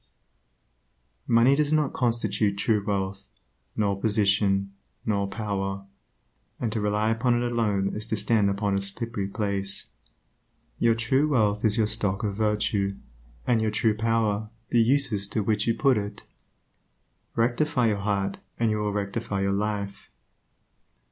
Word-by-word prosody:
Money 120 +3 +5
does 150 0 +1
not 155 -3 +2
constitute 110 -4 0
true 105 0 +1
wealth, 100 -1 -2 0.5
nor 100 -2 +1
position, 100 -2 +2 0.3
nor 100 -2 0
power, 100 -2 -3 0.7
and 115 -3 -1
to 110 - -1
rely 105 +1 +1
upon 120 +2 +2
it 120 0 0
alone 105 -4 0
is 105 +1 -4
to 110 - 0
stand 105 0 +2
upon 100 0 0
a 100 - 0
slippery 100 +1 -3
place. 100 -1 -2 0.9
Your 115 -1 +4
true 130 +6 +2
wealth 105 -6 +2
is 110 -1 +3
your 110 - +3
stock 100 0 0
of 105 -2 -1
virtue, 105 -2 0 0.5
and 115 -2 +2
your 110 - +1
true 105 0 +1
power 110 -1 0 0.2
the 120 - +4
uses 115 -5 +1
to 105 +1 -1
which 105 0 +1
you 115 - +2
put 135 -6 +3
it. 100 0 -6 1.1
Rectify 125 +3 +1
your 105 - 0
heart, 100 -1 -1 0.2
and 115 -2 +1
you 105 - 0
will 105 -1 -1
rectify 100 0 -2
your 100 0 +1
life. 100 -1 -3
105 Hz, 145 wpm, -26 LUFS, 100-115 Hz, 1.1 s, Money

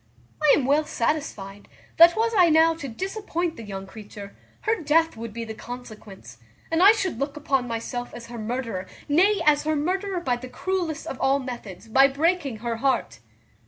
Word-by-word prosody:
I 305 -2 +6
am 275 - 0
well 290 +3 +3
satisfied, 210 -9 -3 0.3
that, 340 +1 +8
was 455 +1 +2
I 360 -4 +6
now 320 +1 +5
to 320 -4 -7
disappoint 355 - -3
the - - -9
young 195 -3 -7
creature, 205 0 -11 0.3
her 440 -4 0
death 325 +2 +2
would 230 0 -7
be 230 +1 -5
the 220 - -6
consequence, 215 - -10 0.3
and 325 +1 +2
I 395 +3 +9
should 380 - -2
look 280 +2 -3
upon 270 -4 0
myself 245 +1 -4
as 235 -1 -9
her 235 0 -8
murderer; 225 -4 -4 0.2
nay, 375 +8 +3
as 295 -1 +4
her 310 0 +1
murderer 370 +5 -1
by 250 -8 -1
the 255 +1 -9
cruellest 345 -2 -3
of 270 -5 -6
all 270 +1 +3
methods, 235 -7 -8
by 265 +5 +6
breaking 285 -2 0
her 230 -1 -1
heart." 270 +3 -1
275 Hz, 185 wpm, -24 LUFS, 230-330 Hz, 0.3 s, I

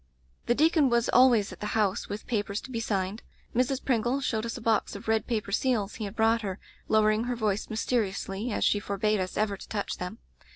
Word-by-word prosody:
"The 240 - +3
deacon 310 -1 +4
was 235 -1 +2
always 240 -6 +5
at - - -13
the 210 +1 -2
house 205 -3 0
with 205 +1 -5
papers 205 -3 -1
to 260 - -10
be 230 - -2
signed. 200 -1 -2 0.3
Mrs. 255 +2 +1
Pringle 245 +1 +1
showed 230 -4 -1
us 230 - -4
a - - -6
box 225 -3 +1
of 200 +3 -9
red 220 0 +1
paper 215 -4 -2
seals 220 -2 +1
he 220 - -3
had 200 +1 -7
brought 225 +1 +3
her, 195 -3 -4 0.3
lowering 215 +1 +3
her 245 0 -1
voice 215 -3 -1
mysteri 220 -1 0
ously 195 +4 -4
as - - -1
she 205 - +3
forbade 205 +1 0
us 185 0 -3
ever 210 -1 +1
to - - -12
touch 205 -2 -3
them. 180 +4 -5
220 Hz, 220 wpm, -28 LUFS, 205-235 Hz, 0.3 s, always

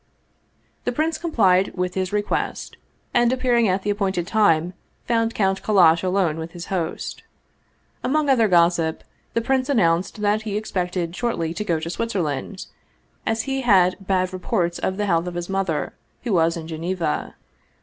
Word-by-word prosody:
The - - 0
prince 315 +1 -1
complied 195 - +2
with 180 -1 -2
his 185 -1 -2
request, 210 0 -2 0.4
and 240 0 +4
appearing 245 -3 +2
at 190 0 0
the 205 - 0
appointed 195 -4 -1
time 180 -4 +2 0.3
found 230 -1 +1
Count 195 -2 +1
Kallash 170 -6 +5
alone 185 -4 +1
with 160 +1 -6
his 175 +2 -7
host. 170 -3 -3 0.8
Among 305 +2 +1
other 245 -5 +4
gossip, 170 -3 +2 0.3
the 230 - +2
prince 265 +1 0
announced 185 -5 +1
that 210 +1 +2
he 210 -2 -3
ex 215 - -6
pected 180 -2 -2
shortly 180 -8 -1
to 210 - -3
go 170 -6 0
to 160 - -5
Switzerland, 185 -5 -3 0.6
as 225 0 0
he 270 -1 -2
had 185 -7 +4
bad 185 -1 +1
reports 180 -2 -1
of 190 - -2
the 210 - 0
health 170 -2 +1
of 175 - -5
his 175 +1 -4
mother, 190 -5 -1 0.3
who 235 -4 -1
was 165 -1 +2
in 160 -1 -7
Geneva. 165 0 -3
190 Hz, 165 wpm, -22 LUFS, 170-220 Hz, 0.8 s, Kallash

